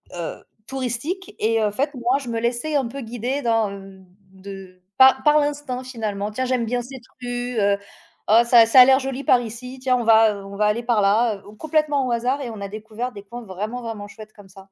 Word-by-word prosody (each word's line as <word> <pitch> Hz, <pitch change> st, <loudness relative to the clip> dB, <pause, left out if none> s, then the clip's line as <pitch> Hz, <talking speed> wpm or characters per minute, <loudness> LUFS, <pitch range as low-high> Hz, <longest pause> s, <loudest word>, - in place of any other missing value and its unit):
heu, 170 Hz, -2 st, -6 dB, 0.2 s
touristiques, 270 Hz, +9 st, -4 dB
et 225 Hz, 0 st, +1 dB
en 210 Hz, -, +1 dB
fait, 285 Hz, +7 st, -1 dB
moi, 245 Hz, +1 st, 0 dB
je 270 Hz, -, -9 dB
me 230 Hz, -1 st, -2 dB
laissais 240 Hz, +6 st, -1 dB
un 270 Hz, -4 st, +1 dB
peu 275 Hz, +4 st, -7 dB
guider 245 Hz, +4 st, -3 dB
dans, 225 Hz, -4 st, +1 dB
heu, 195 Hz, -1 st, -11 dB, 0.3 s
de 190 Hz, -1 st, -11 dB, 0.2 s
pa 265 Hz, 0 st, +7 dB
par 300 Hz, 0 st, +6 dB
l'instinct 290 Hz, -3 st, -3 dB
finalement. 215 Hz, -5 st, -4 dB
«Tiens, 255 Hz, +4 st, -2 dB
j'aime 250 Hz, -2 st, 0 dB
bien 245 Hz, +2 st, -1 dB
cette 255 Hz, 0 st, -10 dB, 0.2 s
rue, 245 Hz, -1 st, -3 dB
heu, 200 Hz, 0 st, +2 dB, 0.5 s
oh 225 Hz, +2 st, +7 dB
ça 235 Hz, -1 st, +7 dB
ça 230 Hz, +3 st, +6 dB
a -, -, +10 dB
l'air 265 Hz, +1 st, +5 dB
joli 270 Hz, 0 st, -4 dB
par 250 Hz, -1 st, +4 dB
ici, 245 Hz, +3 st, -8 dB
tiens 255 Hz, -1 st, +2 dB
on 240 Hz, -, -2 dB
va, 220 Hz, -1 st, +5 dB
heu, 200 Hz, -1 st, -9 dB
on 200 Hz, 0 st, -9 dB
va 210 Hz, +1 st, +1 dB
aller 210 Hz, +3 st, +1 dB
par 235 Hz, -3 st, +2 dB
là, 215 Hz, +3 st, +3 dB
heu», 195 Hz, -, -15 dB, 0.2 s
complètement 305 Hz, -3 st, +1 dB
au 245 Hz, -, -2 dB
hasard 250 Hz, +4 st, 0 dB
et 250 Hz, -, -5 dB
on 215 Hz, -3 st, -8 dB
a 200 Hz, -, -4 dB
découvert 220 Hz, +4 st, -6 dB
des 200 Hz, -3 st, -10 dB
coins 240 Hz, +4 st, -9 dB
vraiment, 210 Hz, +5 st, -5 dB
vraiment 220 Hz, -3 st, -6 dB
chouettes 215 Hz, +1 st, -13 dB
comme 200 Hz, -2 st, -16 dB
ça. 195 Hz, -, -15 dB
235 Hz, 230 wpm, -22 LUFS, 210-255 Hz, 0.5 s, a